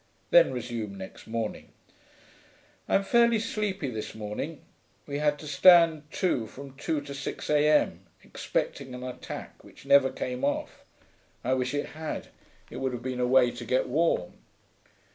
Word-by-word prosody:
Then, -, -, +7 dB
resumed 115 Hz, -4 st, -4 dB
next 95 Hz, 0 st, -10 dB
morning,) 115 Hz, -1 st, -4 dB, 1.2 s
'I'm 195 Hz, -, +3 dB
fairly 235 Hz, +2 st, +4 dB
sleepy 210 Hz, -6 st, -2 dB
this 110 Hz, -2 st, -6 dB
morning; 110 Hz, +9 st, -5 dB, 0.4 s
we 145 Hz, 0 st, -4 dB
had 150 Hz, -1 st, +2 dB
to 150 Hz, -, -11 dB
stand 160 Hz, 0 st, +6 dB
to 130 Hz, -12 st, 0 dB
from 135 Hz, +3 st, -11 dB
two 150 Hz, +2 st, -2 dB
to 140 Hz, -1 st, -8 dB
six 140 Hz, +2 st, -5 dB
A.M., 150 Hz, 0 st, +3 dB, 0.2 s
expecting 130 Hz, -3 st, -3 dB
an 125 Hz, -, -7 dB
attack 125 Hz, -1 st, -8 dB
which -, -, -16 dB
never 140 Hz, -1 st, +6 dB
came 125 Hz, +1 st, -4 dB
off. 140 Hz, -, -2 dB, 0.6 s
I 130 Hz, -, +1 dB
wish 130 Hz, +1 st, -1 dB
it 145 Hz, -, -2 dB
had, 155 Hz, +3 st, -6 dB, 0.4 s
it -, -, -7 dB
would 130 Hz, -1 st, -2 dB
have 120 Hz, -1 st, -6 dB
been 130 Hz, -1 st, -3 dB
a 125 Hz, -, +2 dB
way 125 Hz, -1 st, +5 dB
to 120 Hz, 0 st, -8 dB
get 125 Hz, +3 st, +1 dB
warm. 150 Hz, -, +1 dB
140 Hz, 155 wpm, -28 LUFS, 125-150 Hz, 1.2 s, Then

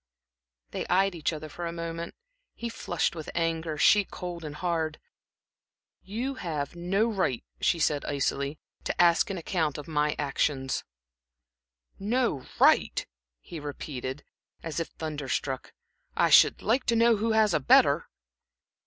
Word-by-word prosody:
They -, -, -4 dB
eyed 190 Hz, +2 st, +3 dB
each 165 Hz, -2 st, -1 dB
other 155 Hz, -1 st, -6 dB
for 170 Hz, +3 st, -5 dB
a -, -, -3 dB
moment, 170 Hz, 0 st, -5 dB, 0.4 s
he 235 Hz, -, -4 dB
flushed 175 Hz, -6 st, -1 dB
with 160 Hz, -2 st, -6 dB
anger, 165 Hz, -2 st, -1 dB
she 205 Hz, +7 st, +6 dB
cold 175 Hz, -3 st, -7 dB
and 150 Hz, -1 st, -6 dB
hard. 160 Hz, -2 st, -1 dB, 1.0 s
"You 235 Hz, +8 st, -3 dB
have 155 Hz, -3 st, -3 dB
no 185 Hz, +5 st, +1 dB
right," 185 Hz, -, -1 dB, 0.2 s
she 175 Hz, -, +2 dB
said, 150 Hz, -2 st, +1 dB
icily, 140 Hz, +1 st, -1 dB, 0.3 s
"to -, -, -3 dB
ask 170 Hz, +1 st, +5 dB
an 195 Hz, -, -3 dB
account 160 Hz, -3 st, -1 dB
of 150 Hz, -, -8 dB
my 150 Hz, -1 st, +1 dB
actions." 135 Hz, -1 st, -1 dB, 1.2 s
"No 215 Hz, -, 0 dB
right!" -, -, +4 dB, 0.4 s
he 170 Hz, -, -8 dB
repeated, 140 Hz, -2 st, -6 dB, 0.4 s
as 165 Hz, -1 st, -3 dB
if 165 Hz, -, -2 dB
thunder 150 Hz, -4 st, -6 dB
struck. 130 Hz, 0 st, -2 dB, 0.5 s
"I -, -, +3 dB
should -, -, +6 dB
like 250 Hz, +4 st, +2 dB
to 235 Hz, -, +3 dB
know 230 Hz, 0 st, +5 dB
who 220 Hz, +2 st, 0 dB
has 215 Hz, -3 st, +4 dB
a -, -, +3 dB
better." 130 Hz, -, +4 dB
165 Hz, 145 wpm, -28 LUFS, 150-190 Hz, 1.2 s, she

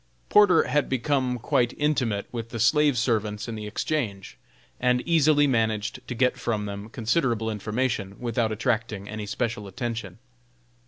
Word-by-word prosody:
Porter 200 Hz, -5 st, +6 dB
had 150 Hz, -1 st, 0 dB
become 130 Hz, -1 st, 0 dB
quite 120 Hz, +1 st, +1 dB
intimate 125 Hz, -9 st, 0 dB
with 115 Hz, -2 st, -5 dB
the 115 Hz, -, -5 dB
slave 145 Hz, +3 st, +4 dB
servants 110 Hz, -3 st, 0 dB
in 115 Hz, -, -4 dB
the 105 Hz, -1 st, -6 dB
Exchange, 105 Hz, -4 st, -3 dB, 0.4 s
and 125 Hz, 0 st, +2 dB
easily 155 Hz, -3 st, +4 dB
managed 110 Hz, -3 st, 0 dB
to 125 Hz, -, -4 dB
get 125 Hz, +1 st, +1 dB
from 110 Hz, -4 st, -1 dB
them 100 Hz, +1 st, -6 dB
considerable 115 Hz, -1 st, 0 dB
information, 105 Hz, -1 st, -2 dB
without 120 Hz, -2 st, 0 dB
attracting 110 Hz, -3 st, -1 dB
any 105 Hz, -1 st, -5 dB
special 110 Hz, 0 st, -3 dB
attention. 110 Hz, -3 st, -5 dB
115 Hz, 145 wpm, -26 LUFS, 105-130 Hz, 0.4 s, Porter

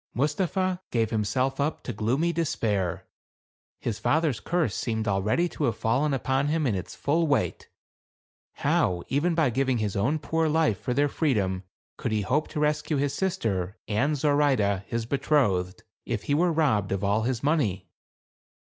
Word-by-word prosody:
Mustapha 180 Hz, +6 st, 0 dB
gave 115 Hz, -2 st, 0 dB
himself 125 Hz, +5 st, 0 dB
up 150 Hz, +2 st, -1 dB
to 120 Hz, -, -4 dB
gloomy 130 Hz, -, 0 dB
despair. 110 Hz, -, -1 dB, 0.7 s
His 110 Hz, -3 st, -3 dB
father's 150 Hz, -7 st, +1 dB
curse 165 Hz, -, 0 dB
seemed 110 Hz, -1 st, -2 dB
already 105 Hz, -, +1 dB
to 150 Hz, -, -2 dB
have 115 Hz, -4 st, 0 dB
fallen 125 Hz, +7 st, +1 dB
upon 135 Hz, +1 st, 0 dB
him 155 Hz, +1 st, +1 dB
in 120 Hz, -, +1 dB
its 95 Hz, -2 st, -5 dB
full 160 Hz, +3 st, +1 dB
weight. 140 Hz, -2 st, 0 dB, 0.8 s
How 90 Hz, -1 st, +1 dB
even 160 Hz, +6 st, +1 dB
by 155 Hz, -6 st, +2 dB
giving 130 Hz, 0 st, +1 dB
his 105 Hz, -3 st, -2 dB
own 120 Hz, +10 st, +1 dB
poor 160 Hz, +1 st, 0 dB
life 150 Hz, -, +1 dB
for 125 Hz, -, -2 dB
their 145 Hz, +2 st, +3 dB
freedom 100 Hz, -, 0 dB, 0.3 s
could 115 Hz, -, -3 dB
he 110 Hz, -1 st, +1 dB
hope 140 Hz, +10 st, 0 dB
to -, -, -5 dB
rescue 150 Hz, 0 st, +1 dB
his 140 Hz, 0 st, 0 dB
sister 110 Hz, -, -1 dB
and 140 Hz, +8 st, +1 dB
Zoraide, 135 Hz, -10 st, +2 dB
his 115 Hz, -1 st, -2 dB
betrothed, 110 Hz, -9 st, +1 dB, 0.2 s
if 115 Hz, -4 st, -3 dB
he 145 Hz, -, -1 dB
were 170 Hz, +4 st, +3 dB
robbed 130 Hz, -, +1 dB
of 100 Hz, 0 st, -1 dB
all 100 Hz, +2 st, +2 dB
his 120 Hz, +1 st, -2 dB
money 110 Hz, -, 0 dB
130 Hz, 165 wpm, -26 LUFS, 105-150 Hz, 0.8 s, their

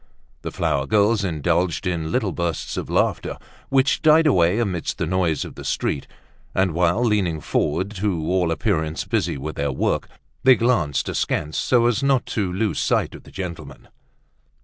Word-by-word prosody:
The -, -, -4 dB
flower 70 Hz, -1 st, -1 dB
girls 105 Hz, +2 st, +3 dB
indulged 85 Hz, +1 st, 0 dB
in 80 Hz, -3 st, -2 dB
little 110 Hz, -7 st, 0 dB
bursts 85 Hz, -2 st, -3 dB
of -, -, -4 dB
laughter -, -, 0 dB, 0.3 s
which 135 Hz, +1 st, +2 dB
died 155 Hz, 0 st, +5 dB
away 90 Hz, -, +3 dB
amid 95 Hz, -8 st, -1 dB
the 90 Hz, -, -2 dB
noise 85 Hz, -2 st, 0 dB
of -, -, -9 dB
the -, -, -10 dB
street, 70 Hz, -, -2 dB, 0.5 s
and 95 Hz, -3 st, +2 dB
while 90 Hz, +7 st, +2 dB
leaning 95 Hz, -8 st, +1 dB
forward, 80 Hz, +6 st, -1 dB
to 90 Hz, -5 st, -1 dB
all 90 Hz, -1 st, +1 dB
appearance 80 Hz, -1 st, -1 dB
busy -, -, -1 dB
with 75 Hz, +3 st, -6 dB
their 70 Hz, 0 st, 0 dB
work, 65 Hz, -, -1 dB, 0.3 s
they 130 Hz, 0 st, +7 dB
glanced 115 Hz, -, +1 dB
askance 75 Hz, +1 st, -1 dB
so 120 Hz, -2 st, +3 dB
as 120 Hz, +2 st, +2 dB
not 135 Hz, -2 st, +2 dB
to 100 Hz, -5 st, -1 dB
lose 100 Hz, +3 st, -1 dB
sight -, -, +1 dB
of -, -, -12 dB
the -, -, -14 dB
gentleman. 90 Hz, -4 st, -7 dB
90 Hz, 170 wpm, -22 LUFS, 80-110 Hz, 0.5 s, they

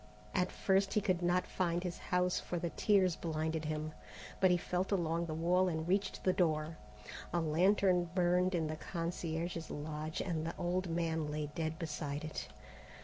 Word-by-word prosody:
At 185 Hz, -1 st, +1 dB
first 195 Hz, +2 st, +2 dB
he -, -, +5 dB
could 185 Hz, -4 st, +1 dB
not 175 Hz, +1 st, +2 dB
find 175 Hz, -1 st, 0 dB
his 180 Hz, -1 st, -4 dB
house, 180 Hz, 0 st, +1 dB
for 175 Hz, -, -4 dB
the 170 Hz, 0 st, -2 dB
tears 190 Hz, -5 st, +3 dB
blinded 160 Hz, -1 st, -2 dB
him, 155 Hz, 0 st, -3 dB, 0.5 s
but 190 Hz, -, +5 dB
he 180 Hz, -, +4 dB
felt 180 Hz, +2 st, -1 dB
along 170 Hz, -3 st, +1 dB
the 155 Hz, -, -3 dB
wall 180 Hz, +3 st, +3 dB
and 160 Hz, -2 st, -2 dB
reached 195 Hz, +3 st, 0 dB
the 185 Hz, -, +3 dB
door. 160 Hz, -3 st, +1 dB, 0.5 s
A 175 Hz, -, +1 dB
lantern 180 Hz, +2 st, +3 dB
burned 180 Hz, 0 st, +3 dB
in 165 Hz, -2 st, +1 dB
the 155 Hz, 0 st, -3 dB
concierge's 165 Hz, -1 st, -3 dB
lodge 155 Hz, +1 st, -4 dB
and 165 Hz, -4 st, -1 dB
the 165 Hz, -, -3 dB
old 180 Hz, +1 st, -1 dB
man 165 Hz, -2 st, 0 dB
lay 150 Hz, 0 st, -3 dB
dead 160 Hz, -2 st, -2 dB
beside 150 Hz, -2 st, -3 dB
it. 155 Hz, -, -5 dB
170 Hz, 175 wpm, -35 LUFS, 160-180 Hz, 0.5 s, he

